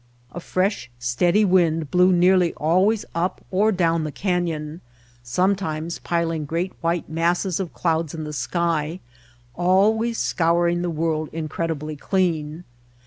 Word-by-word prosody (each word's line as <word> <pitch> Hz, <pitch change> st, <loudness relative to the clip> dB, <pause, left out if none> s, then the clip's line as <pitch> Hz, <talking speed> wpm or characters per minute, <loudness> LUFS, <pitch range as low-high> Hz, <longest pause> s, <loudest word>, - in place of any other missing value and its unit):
A 175 Hz, -, -6 dB
fresh, 185 Hz, -, -1 dB
steady 170 Hz, -, +2 dB
wind 165 Hz, -5 st, +2 dB
blew 180 Hz, +1 st, +5 dB
nearly 180 Hz, 0 st, +3 dB
always 185 Hz, +8 st, +2 dB
up 170 Hz, +3 st, -2 dB
or 205 Hz, +4 st, +3 dB
down 165 Hz, -4 st, +1 dB
the 155 Hz, -, -3 dB
canyon, 170 Hz, -3 st, -2 dB, 0.4 s
sometimes 170 Hz, +3 st, -1 dB
piling 165 Hz, -2 st, -1 dB
great 170 Hz, +5 st, -2 dB
white 170 Hz, 0 st, -1 dB
masses 170 Hz, +3 st, 0 dB
of 185 Hz, -4 st, -3 dB
clouds 165 Hz, -2 st, -1 dB
in 160 Hz, -, -5 dB
the 150 Hz, 0 st, -6 dB
sky, 160 Hz, +5 st, -1 dB, 0.5 s
always 210 Hz, -, +2 dB
scouring 170 Hz, +1 st, +1 dB
the 175 Hz, -, -1 dB
world 155 Hz, -1 st, -1 dB
in 160 Hz, -1 st, -4 dB
credibly 155 Hz, -1 st, -3 dB
clean. 165 Hz, -1 st, -1 dB
170 Hz, 135 wpm, -23 LUFS, 155-185 Hz, 0.5 s, blew